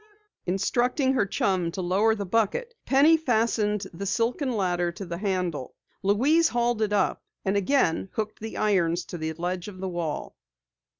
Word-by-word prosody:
Instructing 245 - +1
her 235 -7 +1
chum 185 -3 0
to 195 - -5
lower 200 +5 +3
the 205 -2 -4
bucket, 230 - 0
Penny 295 +4 +6
fastened 220 -7 +1
the 200 +4 -5
silken 245 +6 0
ladder 180 -5 0
to 195 +3 -8
the 170 -1 -5
handle. 180 -9 -2 0.3
Louise 270 +12 +3
hauled 240 -1 0
it 215 -1 +1
up, 200 -2 +1 0.2
and 190 +1 +1
again 195 -4 +1
hooked 215 -1 -3
the 220 +1 -6
irons 180 -5 +1
to 175 - -7
the 160 0 -2
ledge 175 +3 -3
of 200 -3 -9
the 190 0 -3
well. 170 -4 -4
200 Hz, 165 wpm, -26 LUFS, 180-235 Hz, 0.3 s, Penny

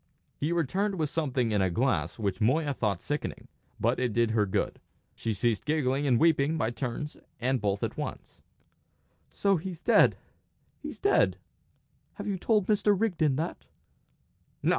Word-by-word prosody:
He 150 +4 -2
returned 185 +5 0
with 155 -5 -1
something 130 -7 0
in 105 -2 +2
a 95 - +2
glass 125 +10 0
which 105 -1 -2
Moya 145 +6 +2
thought 105 -8 -1
sickening. 145 0 -4 0.3
But - - +1
it 125 -3 0
did 115 0 +2
her 105 -2 +2
good. 95 - -1 0.3
She 115 - -3
ceased 110 +1 0
giggling 145 -1 0
and 120 -3 +3
weeping 160 -1 +3
by 115 -5 0
turns 135 +4 -4 0.2
and 130 0 0
both 100 -1 -1
at - - -3
once. - - -6 0.9
"So 200 -2 +1
he's 175 0 -7
dead - - +5 0.6
he's - - -7
dead! 405 - +3 0.8
Have 205 - -6
you 195 -3 -2
told 210 0 +2
Mr. 205 -1 +2
Rigden 165 -10 +1
that?" 160 +5 -4
140 Hz, 155 wpm, -29 LUFS, 115-170 Hz, 0.9 s, dead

